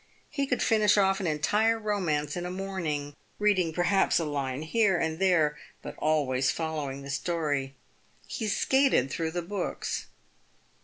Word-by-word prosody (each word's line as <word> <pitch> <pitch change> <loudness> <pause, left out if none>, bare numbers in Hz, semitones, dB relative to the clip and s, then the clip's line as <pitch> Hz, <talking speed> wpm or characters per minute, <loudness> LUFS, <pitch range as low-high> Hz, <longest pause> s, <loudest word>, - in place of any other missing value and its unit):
He 280 -2 -1
could 250 - 0
finish 215 -2 +4
off 195 0 +3
an 190 - -2
entire 210 +9 +2
romance 175 -9 -1
in 175 - -3
a 180 - -4
morning, 170 -7 -3 0.2
reading 195 -5 +2
perhaps 180 +4 +2
a 165 - 0
line 140 -1 -3
here 195 +2 +2
and 160 0 -2
there, 165 -6 +2 0.2
but - - -7
always 135 -4 +1
following 145 -3 -3
the 140 - -6
story. 145 -4 -2 0.5
He 220 - -4
skated 235 - +2
through 165 -1 -2
the 175 +1 -3
books. 190 +1 -3
170 Hz, 150 wpm, -28 LUFS, 150-200 Hz, 0.5 s, finish